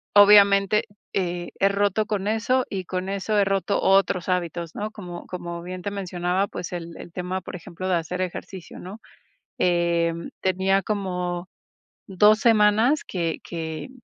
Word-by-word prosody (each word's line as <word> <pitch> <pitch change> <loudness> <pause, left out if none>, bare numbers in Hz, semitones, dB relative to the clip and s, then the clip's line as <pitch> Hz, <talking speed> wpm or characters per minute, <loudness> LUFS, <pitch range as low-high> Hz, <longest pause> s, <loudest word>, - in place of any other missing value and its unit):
obviamente, 200 0 +6 0.3
eh, 175 -2 -2
he 195 - +5
roto 205 +1 +1
con 205 -2 -2
eso, 230 +4 +1
y 190 -2 -4
con 185 +1 -3
eso 200 +2 -1
he 205 - +5
roto 195 +1 0
otros 190 -2 +3
hábitos, 170 -2 -2
¿no? 210 +1 -4
Como 180 -5 -8
como 175 -1 -6
bien 180 +1 -7
te 200 - -4
mencionaba, 185 0 -1
pues, 180 - -6
el 170 -1 -6
el - - -10
tema, 180 +2 -3
por - - -8
ejemplo, 180 +2 -6
de 185 - +3
hacer 175 +2 -2
ejercicio, 185 0 -6
¿no? 195 +5 -9 0.6
Em, 170 -1 +1
tenía 190 +1 +2
como, 180 -3 -3 0.6
2 210 +2 +5
semanas 225 +5 +4
que 170 -3 -3
que, 160 +4 -5
185 Hz, 155 wpm, -24 LUFS, 175-200 Hz, 0.6 s, obviamente